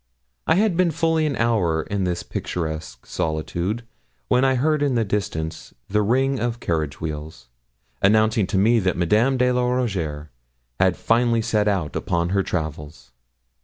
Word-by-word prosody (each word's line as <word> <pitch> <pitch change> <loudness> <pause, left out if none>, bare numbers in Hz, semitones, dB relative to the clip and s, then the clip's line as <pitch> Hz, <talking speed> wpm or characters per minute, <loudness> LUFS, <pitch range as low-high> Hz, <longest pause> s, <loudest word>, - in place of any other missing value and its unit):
I 160 - +4
had 205 -1 +2
been 180 0 +3
fully 165 0 +1
an 140 - -1
hour 100 -10 +1
in 100 -2 -2
this 90 -1 -2
picturesque 80 -7 -5
solitude 85 +6 -2 0.5
when 125 +1 +3
I 135 -1 +3
heard 150 +3 +1
in 140 -3 +1
the 115 -2 +1
distance 80 -6 -3
the 105 +1 +2
ring 130 +5 +1
of 120 +1 -2
carriage 80 - -2
wheels, 75 -5 -6 0.5
announcing 110 0 +3
to 100 - -1
me 115 +5 +4
that 95 -3 0
Madame 110 +10 +2
de 125 0 +3
la 125 0 +1
Rougierre 95 - -2 0.5
had - - +3
fairly 115 -1 +2
set 110 -2 +1
out 95 -7 -1
upon 85 0 -1
her 100 +1 +2
travels. 75 -7 -5
105 Hz, 160 wpm, -23 LUFS, 80-125 Hz, 0.5 s, I